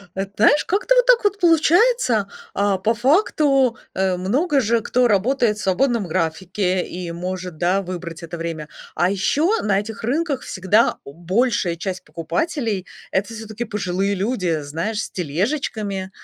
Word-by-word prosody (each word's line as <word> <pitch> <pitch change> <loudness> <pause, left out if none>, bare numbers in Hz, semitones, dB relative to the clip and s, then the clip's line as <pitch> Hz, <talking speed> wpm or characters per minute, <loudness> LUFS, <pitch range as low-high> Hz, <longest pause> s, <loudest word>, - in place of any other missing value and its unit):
Эт 195 +1 -4
знаешь, 290 +8 +4
как-то 415 +6 +2
вот - - +4
так - - +5
вот 410 0 +1
получается. 335 - +3 0.3
А, 200 -1 +1
по 220 +5 +1
факту, 270 - +2 0.2
э, 190 -1 +1
много 270 - +1
же 230 -1 +1
кто 245 +2 +2
работает 220 +1 +2
в - - -6
свободном 225 +3 +1
графике 180 +3 -1
и 175 -1 -6
может, 180 -1 -5
да, 180 +4 +1
выбрать 175 -2 -7
это 170 +1 -6
время. 165 -2 -5 0.3
А 175 - +2
еще 295 - +1
на 200 -2 +2
этих 215 +1 -8
рынках 280 +3 -1
всегда 190 +4 +2
большая 175 - 0
часть 185 +2 -5
покупателей- 220 - -2 0.3
это, 205 +4 -1
всё-таки, 220 +1 -6
пожилые 200 -2 -1
люди. 185 -6 -1
Знаешь, 165 +10 -3
с - - -7
тележечками, 195 - -2
205 Hz, 150 wpm, -21 LUFS, 180-255 Hz, 0.3 s, так